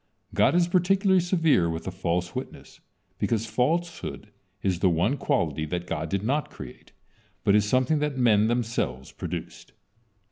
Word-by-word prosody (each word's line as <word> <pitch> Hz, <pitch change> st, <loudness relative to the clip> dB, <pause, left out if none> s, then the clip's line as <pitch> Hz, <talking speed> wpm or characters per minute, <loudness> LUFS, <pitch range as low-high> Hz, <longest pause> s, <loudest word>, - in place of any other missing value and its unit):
God -, -, +3 dB
is 175 Hz, -1 st, +4 dB
particularly 190 Hz, +2 st, +3 dB
severe 165 Hz, -, +2 dB
with 80 Hz, 0 st, -4 dB
a 95 Hz, -, -3 dB
false 90 Hz, -1 st, -2 dB
witness -, -, -8 dB, 0.4 s
because 115 Hz, -1 st, 0 dB
falsehood 125 Hz, 0 st, -2 dB, 0.3 s
is 95 Hz, -3 st, 0 dB
the 95 Hz, -, +4 dB
one 90 Hz, -, +1 dB
quality 85 Hz, -, 0 dB
that 90 Hz, +2 st, -3 dB
God 80 Hz, -2 st, -3 dB
did 100 Hz, +2 st, -1 dB
not 140 Hz, +6 st, 0 dB
create, -, -, -11 dB, 0.5 s
but 100 Hz, -, +3 dB
is 105 Hz, 0 st, +4 dB
something 130 Hz, +5 st, +2 dB
that 150 Hz, -2 st, -2 dB
men 110 Hz, -4 st, +4 dB
themselves 115 Hz, -, -2 dB
produces. -, -, -6 dB
115 Hz, 150 wpm, -26 LUFS, -, 0.5 s, is